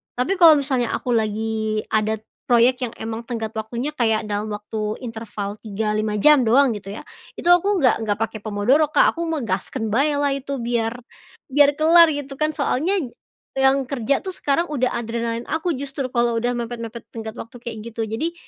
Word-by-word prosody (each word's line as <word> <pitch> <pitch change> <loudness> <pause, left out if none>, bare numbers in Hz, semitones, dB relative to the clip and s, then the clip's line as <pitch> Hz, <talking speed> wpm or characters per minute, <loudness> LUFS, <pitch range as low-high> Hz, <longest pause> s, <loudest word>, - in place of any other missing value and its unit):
tapi 270 +11 0
kalau 325 -3 +9
misalnya 260 -4 -1
aku 250 - -5
lagi 220 -1 0
ada 215 0 0 0.2
proyek 245 +1 +3
yang 235 - -3
emang 225 +1 -5
tenggat 225 -2 -5
waktunya 235 +7 -4
kayak 220 -4 +1
dalam 210 +1 -3
waktu 210 +1 -4
interval 220 -4 -6
3, 210 0 -2
5 215 -1 -1
jam 300 +2 +6
doang 245 +1 +4
gitu 200 -1 -8
ya, 210 - -6 0.4
itu - - -4
aku 360 +3 +4
nggak 240 -3 +3
nggak 205 -1 0
pakai 220 -1 -3
pomodoro, 245 +9 +2
Kak, - - +4
aku 335 - -3
mah 325 -2 -1
gaskeun 220 +5 -2
baelah 285 +4 +1
itu 275 0 -4
biar, 235 -1 -1 0.6
biar 290 +1 +5
kelar 330 +1 +7
gitu 280 -1 -6
kan. 305 +2 0
Soalnya 320 +6 0 0.6
yang 270 0 +3
kerja 275 0 0
tuh 375 - -6
sekarang 285 +4 0
udah 260 -4 0
adrenalin 230 0 -3
aku 325 +3 -1
justru 270 -1 -4
kalau 235 -1 +1
udah 245 0 0
mepet-mepet 235 -1 -6
tenggat 220 -1 -5
waktu 230 +2 -9
kayak 230 -2 -6 0.2
gitu. 225 - -4
Jadi, 225 +10 -3
235 Hz, 180 wpm, -22 LUFS, 220-280 Hz, 0.6 s, kalau